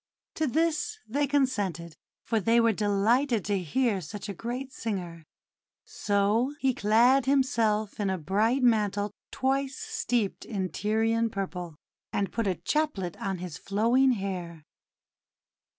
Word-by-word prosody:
To 315 - 0
this 330 - 0
they 285 +6 0
consented, 205 - 0 0.3
for 225 - 0
they 230 +4 +3
were 230 -1 +4
delighted 220 +3 +1
to 200 -1 0
hear 210 - 0
such 205 +7 -7
a - - -3
great 250 +7 -5
singer. 180 -7 -4 0.6
So 210 +7 +1
he 265 -3 +2
clad 240 +6 +4
himself 220 -7 +1
in 200 -2 0
a 190 - 0
bright 215 - +1
mantle 210 -3 +2 0.2
twice 270 +1 -1
steeped 440 - -2
in 190 -4 -3
Tyrian 225 +4 +1
purple, 180 -5 -5 0.4
and 200 -1 -1
put 230 -3 -1
a 185 - +1
chaplet 195 - -1
on 195 -1 -2
his 180 -2 -7
flowing 235 +6 +3
hair. 180 -6 -5
220 Hz, 135 wpm, -28 LUFS, 195-260 Hz, 0.6 s, were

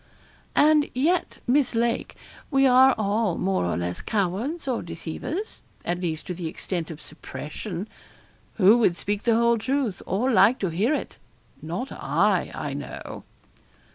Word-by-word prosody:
'And 300 0 +5
yet, 330 +8 +1
Miss 255 -1 +2
Lake, 235 +1 0 0.3
we 275 -2 +3
are 260 0 +6
all 210 -2 0
more 190 - 0
or 85 - -1
less 90 0 -3
cowards 220 - -2
or 250 -3 0
deceivers 175 - -5 0.2
at 175 0 -1
least, 160 -3 -3
to 180 - -4
the 175 -1 -5
extent 170 -1 -4
of 160 -2 -8
suppression. 170 +6 -7 0.7
Who 215 +3 +6
would 195 -7 +3
speak 205 +3 -2
the 230 -1 +3
whole 235 0 +3
truth, 260 -4 -1
or 230 +8 +1
like 215 +4 +5
to 190 - 0
hear 210 - +1
it? - - -6 0.4
not 175 +12 -4
I, - - +1
I - - -4
know.' - - -7
215 Hz, 150 wpm, -25 LUFS, 175-255 Hz, 0.7 s, are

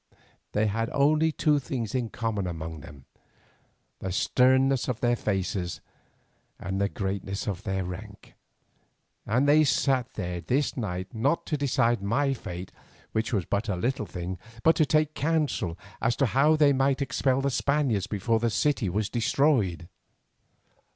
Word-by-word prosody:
They 105 +1 +2
had 115 +2 -1
only 155 +3 +3
two 150 -1 +2
things 120 -4 -4
in 125 -3 -1
common 110 -5 -2
among 80 -2 -5
them, 70 -1 -13 0.9
the 95 - -4
sternness 130 +6 +3
of 125 -3 -2
their 120 0 +2
faces 95 -4 -2 0.8
and 95 +1 -3
the 100 - +1
greatness 100 0 -3
of 100 -3 -3
their 95 -2 -2
rank, 100 +3 -9 0.9
and 125 +6 +2
they 150 +2 +6
sat 135 -3 +1
there 90 -3 -3
this 130 - 0
night 95 -6 -4
not 135 +8 0
to 155 - -1
decide 125 -6 +1
my 135 +8 +1
fate, 90 -6 -7 0.4
which 110 0 -1
was 100 -7 0
but 105 +2 -1
a 100 - 0
little 115 +3 -1
thing, 90 0 -5 0.2
but 160 - +5
to 155 - +3
take 155 0 +2
counsel 150 - -1 0.2
as 115 +1 +1
to 135 - +2
how 140 +6 +4
they 145 -2 +5
might 135 +1 +2
expel 135 -1 +1
the 140 0 0
Spaniards 130 -8 +1
before 110 +2 0
the 115 +1 +1
city 120 -3 +1
was 105 +3 -1
destroyed. 115 - +1
115 Hz, 155 wpm, -27 LUFS, 95-140 Hz, 0.9 s, they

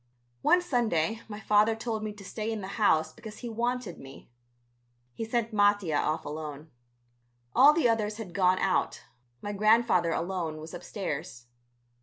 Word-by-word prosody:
One 355 - +4
Sunday 225 - 0
my 210 -1 -7
father 215 +1 +3
told 220 -1 -3
me 215 - -3
to 205 -1 -13
stay 215 +3 -4
in 220 -2 -3
the 190 - -6
house 160 -6 +3
because 220 -2 -10
he 240 - -6
wanted 235 -4 -2
me. 135 -2 -13 0.8
He 225 - -5
sent 230 0 -1
Mattia 205 -5 +3
off 155 +1 -1
alone. 150 0 -7 0.8
All 270 +4 +8
the 310 -4 +2
others 215 -2 0
had 205 -6 -8
gone 185 0 +3
out; 190 -1 0 0.4
my 205 - -3
grandfather 215 -4 +3
alone 170 -2 -2
was 155 +1 -9
upstairs. 160 - -5
205 Hz, 155 wpm, -28 LUFS, 170-225 Hz, 0.8 s, All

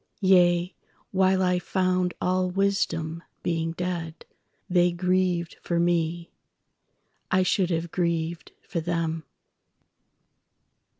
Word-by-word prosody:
Yea, 180 -2 +4 0.4
while 190 0 +3
I 180 -1 +2
found 185 0 0
all 185 0 +1
wisdom 170 -4 0 0.2
(being 165 -1 -1
dead),They 175 +1 -2
grieved 180 -1 0
for 170 -1 -1
me… 170 0 0 1.0
I 185 0 +3
should 185 0 +1
have 165 -1 -2
grieved 170 -1 -2
for 170 - -3
them! 165 -1 -2
175 Hz, 95 wpm, -26 LUFS, 170-185 Hz, 1.0 s, Yea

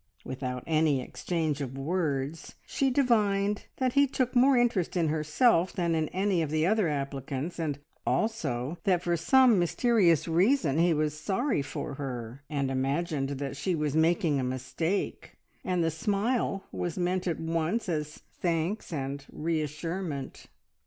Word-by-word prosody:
Without 125 -1 -4
any 155 -3 +2
exchange 155 +2 -2
of 135 -1 -5
words 150 -1 -2
she 275 - 0
divined 210 -6 +2
that 255 -2 0
he 280 0 +5
took 255 -1 -1
more 260 +2 +5
interest 230 -8 +1
in 165 -3 +2
herself 165 - +2
than 170 -2 0
in 160 -1 +1
any 190 0 0
of 155 - -1
the 155 +1 +1
other 210 0 +2
applicants, 140 +2 -3
and 150 -4 -1 0.3
also 160 - -1
that 180 -2 +2
for 175 -1 +1
some 240 - +5
mysterious 175 - +3
reason 170 - +2
he 175 +1 +4
was 155 -1 +1
sorry 195 - 0
for 145 +1 -5
her, 130 -2 -6
and 140 -3 -1
imagined 135 +2 -1
that 140 0 -4
she 170 +6 -1
was 150 -2 -1
making 160 -2 +2
a - - -1
mistake, 130 +9 -3 0.3
and 180 -2 0
the 165 - +1
smile 200 - 0
was 175 -2 -3
meant 180 +1 0
at 170 - -1
once 165 +7 -1
as 150 -3 -3 0.2
thanks 175 +4 -1
and 140 -2 -4
reassurement. 155 -1 -3
165 Hz, 150 wpm, -29 LUFS, 145-195 Hz, 0.3 s, he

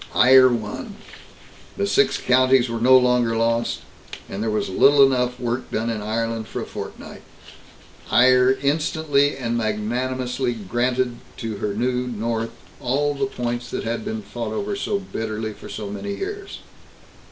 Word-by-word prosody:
Eire 130 +1 +7
won. 110 -4 -4 0.8
The 100 - 0
Six 100 0 +2
Counties 130 -1 +3
were 115 -1 -3
no 130 +2 +7
longer 125 -2 +2
lost, 115 +1 0 0.5
and 100 - -5
there 110 - 0
was 105 0 -1
little 140 +9 +6
enough 125 -2 0
work 120 +1 -3
done 115 +1 -1
in 110 -2 -3
Ireland 115 +1 -2
for - - -5
a - - -4
fortnight. - - -8 0.9
Eire 130 +1 +5
instantly 145 -1 +1
and 120 -3 -2
magnanimously 125 +3 -1
granted 120 +4 -1 0.2
to 110 -3 -4
her 100 0 -3
new 125 +2 -1
north 115 0 -2 0.3
all 145 +4 0
the 145 +8 -1
points 120 -8 -4
that - - -4
had 115 0 -3
been 110 -1 -4
fought 110 +2 -5
over 200 - -2
so 200 +1 -1
bitterly 110 - -4
for - - -12
so 105 - -5
many 150 - -4
years. 400 0 -6
120 Hz, 150 wpm, -22 LUFS, 110-130 Hz, 0.9 s, Eire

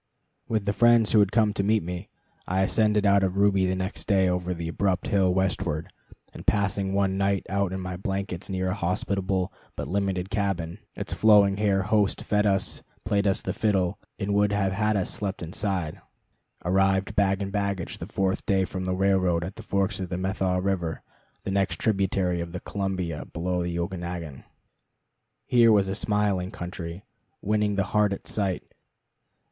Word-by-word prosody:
With 110 -3 -1
the 100 - +1
friends 120 -1 +5
who 110 - +5
had 100 -1 +4
come 110 -3 +3
to 100 - -1
meet 110 0 +2
me, 90 +1 -6 0.4
I 95 +1 +1
ascended 105 +1 +2
out 100 0 +5
of 95 0 0
Ruby 100 -2 +3
the 95 - 0
next 95 +3 -4
day 95 -3 +4
over 90 0 -1
the 85 -2 -3
abrupt 95 +2 0
hill 95 -2 +3
westward, 90 -4 -1 0.4
and - - -11
passing 100 -1 +1
one 95 -1 +1
night 100 -1 +1
out 100 -1 0
in 95 - -3
my 90 -1 -4
blankets 95 -1 -4
near 95 -1 -1
a - - 0
hospitable 95 0 -1 0.2
but - - -4
limited 95 -1 -1
cabin 100 -4 -2 0.2
(its 100 - -4
flowing 100 -2 +5
haired 100 -2 +2
host 105 -2 +2
fed 105 0 +2
us, 95 -1 0 0.2
played 100 0 +1
us 95 - +1
the - - -2
fiddle, 100 -2 0 0.2
and 100 -1 -2
would 105 0 +3
have 100 -2 +1
had 105 +2 +1
us 95 - -1
sleep 100 -1 -3
inside), 90 -2 -3 0.6
arrived 95 +1 +2
bag 95 -1 +2
and 100 -1 -3
baggage 100 -3 -2
the - - -6
fourth 95 -1 -1
day 95 -1 +3
from 95 +1 -5
the 90 0 0
railroad 95 -3 +2
at 95 +3 -6
the - - -9
forks 100 -1 -1
of 95 -2 -4
the 90 - -2
Methow 95 0 0
River 90 -4 -2 0.4
the 95 - -3
next 95 -1 +1
tributary 95 -4 +1
of 85 0 -6
the 90 - -3
Columbia 95 -6 -3
below 90 +1 -2
the 85 0 -2
Okanagon. 85 -4 -5 1.0
Here 120 -2 +5
was 100 -2 +4
a 95 - -1
smiling 100 -3 0
country, 90 -2 -7 0.4
winning 105 0 +1
the 100 - +2
heart 105 -1 +3
at - - -8
sight. 95 -4 -1
95 Hz, 180 wpm, -26 LUFS, 90-100 Hz, 1.0 s, friends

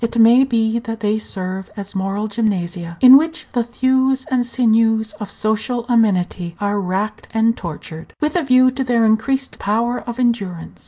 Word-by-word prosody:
It 230 +1 -2
may 235 +3 +6
be 230 -2 0
that 225 -1 -7
they 210 0 0
serve 190 -2 -5
as 200 -1 -7
moral 195 +2 -2
gymnasia, 180 -6 -3
in 260 +1 +10
which 320 +3 -2
the 240 - +1
thews 260 +2 0
and 255 -1 +2
sinews 225 -2 +1
of 210 -2 -6
social 220 +3 -2
amenity 185 -7 0
are 205 0 -1
racked 195 +3 -3
and 225 +1 +2
tortured, 160 -1 -9
with 300 +2 -1
a 355 - +2
view 255 -2 +4
to 265 +1 -3
their 240 -3 +2
increased 265 +5 0
power 230 +4 -1
of 240 +1 -8
endurance. 200 -9 -2
225 Hz, 170 wpm, -18 LUFS, 200-245 Hz, -, in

